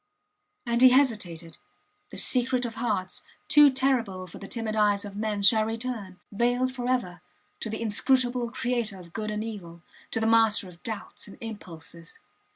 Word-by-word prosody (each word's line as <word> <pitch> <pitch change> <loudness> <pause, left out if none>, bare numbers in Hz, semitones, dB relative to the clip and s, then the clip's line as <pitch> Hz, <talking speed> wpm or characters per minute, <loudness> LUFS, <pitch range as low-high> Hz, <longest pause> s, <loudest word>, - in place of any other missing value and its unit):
And 235 0 0
he 255 - +9
hesitated. 200 - 0 0.5
The - - -10
secret 250 0 +2
of 230 - -4
hearts, 210 -6 -2 0.3
too 295 -1 +8
terrible 250 -8 0
for 175 - -12
the 195 - -9
timid 225 -1 -3
eyes 205 -1 +2
of 200 -1 -8
men, 210 -1 -2
shall 215 +2 +6
return, 225 -4 -4
veiled 245 +4 +1
forever, 245 -9 -2 0.4
to 220 - -4
the 220 +2 -4
Inscrutable 245 +2 +1
Creator 235 -5 -2
of 170 -2 -14
good 215 -1 -3
and 210 0 -3
evil, 175 -7 -8 0.3
to - - -1
the 220 - 0
Master 225 -3 +3
of 175 -1 -15
doubts 220 -2 -5
and 200 - -12
impulses. 170 -6 -9
220 Hz, 160 wpm, -27 LUFS, 195-245 Hz, 0.5 s, he